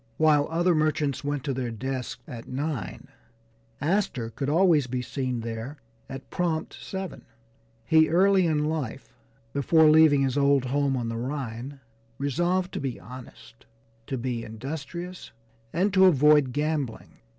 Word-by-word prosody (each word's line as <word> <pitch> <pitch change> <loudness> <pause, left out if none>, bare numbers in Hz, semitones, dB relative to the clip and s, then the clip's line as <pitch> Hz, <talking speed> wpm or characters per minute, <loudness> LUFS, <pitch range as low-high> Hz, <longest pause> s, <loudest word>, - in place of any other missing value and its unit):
While 150 -2 +4
other 170 +2 +2
merchants 155 -3 0
went 145 -2 -2
to 140 - -2
their 125 -2 -3
desks 130 +3 -5
at 120 -6 -8
nine, 140 0 -4 0.7
Astor 150 - -1
could 135 +4 -3
always 160 -4 +4
be 125 0 -3
seen 130 -3 -3
there 115 +5 -6 0.3
at 135 0 -9
prompt 165 -3 -1
seven. 190 -1 -7 0.6
He 160 +5 +4
early 185 +2 +4
in 150 -2 +1
life, 155 -6 -4 0.4
before 155 +3 +5
leaving 155 -3 +6
his 135 +1 0
old 140 -2 +3
home 135 +1 0
on 120 -2 -2
the 115 - -4
Rhine, 130 +1 -5 0.4
resolved 175 +6 0
to - - -3
be 135 -3 -4
honest, 115 - -13 0.4
to 135 - -3
be 120 -1 -3
industrious, 155 +10 -7 0.4
and 190 +4 +1
to 190 -1 +6
avoid 150 -5 +5
gambling. 150 -3 -3
145 Hz, 140 wpm, -26 LUFS, 130-160 Hz, 0.7 s, leaving